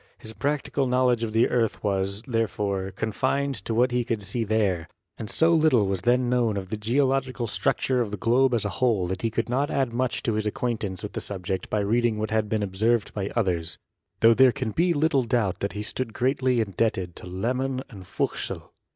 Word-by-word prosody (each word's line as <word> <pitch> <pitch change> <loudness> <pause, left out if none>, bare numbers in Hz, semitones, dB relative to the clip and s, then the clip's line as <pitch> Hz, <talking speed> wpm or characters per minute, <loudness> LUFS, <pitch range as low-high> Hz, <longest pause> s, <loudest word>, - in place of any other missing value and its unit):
His 110 - -8
practical 140 0 -1
knowledge 125 -2 +2
of 115 -2 -2
the 115 +2 +3
earth 115 -3 0
was, 100 0 0
there 115 -4 0
fore, 100 -2 -2
confined 130 +8 -1
to 115 - -2
what 125 +2 +3
he 125 0 +1
could 115 -3 -3
see 105 +5 -2
there, 100 -6 0 0.3
and 110 - -5
so 165 +1 +3
Httle 155 -10 +4
was 95 -2 -1
then 125 +1 +2
known 120 -4 +1
of 95 -2 -5
the 110 - -2
geological 130 +3 0
structure 125 +5 0
of 115 - -1
the 105 - -4
globe 125 +5 +3
as 110 - -1
a - - 0
whole 115 -8 +3
that 95 +1 -3
he 115 - 0
could 115 +1 -2
not 135 +4 0
add 130 -4 0
much 125 0 -1
to 115 - 0
his 105 0 -1
acquaintance 105 -4 -3
with - - -5
the - - -3
subject 95 -2 -4
by 105 - 0
reading 115 +2 +1
what 110 +1 -3
had 110 -1 0
been 110 -1 0
observed 105 +3 0
by 100 -1 -3
others, 85 -7 -1 0.4
tho 115 +1 +7
there 130 +2 +6
can 120 -2 -3
be 170 - +2
little 150 -3 +2
doubt 115 -5 0
that 100 - -2
he 105 - -4
stood 115 +1 -4
greatly 130 -1 +1
indebted 95 -3 -1
to - - -9
Lehmann 125 +8 -2
and 95 -6 -12
Fuchsel. - - -3
115 Hz, 210 wpm, -25 LUFS, 100-125 Hz, 0.4 s, tho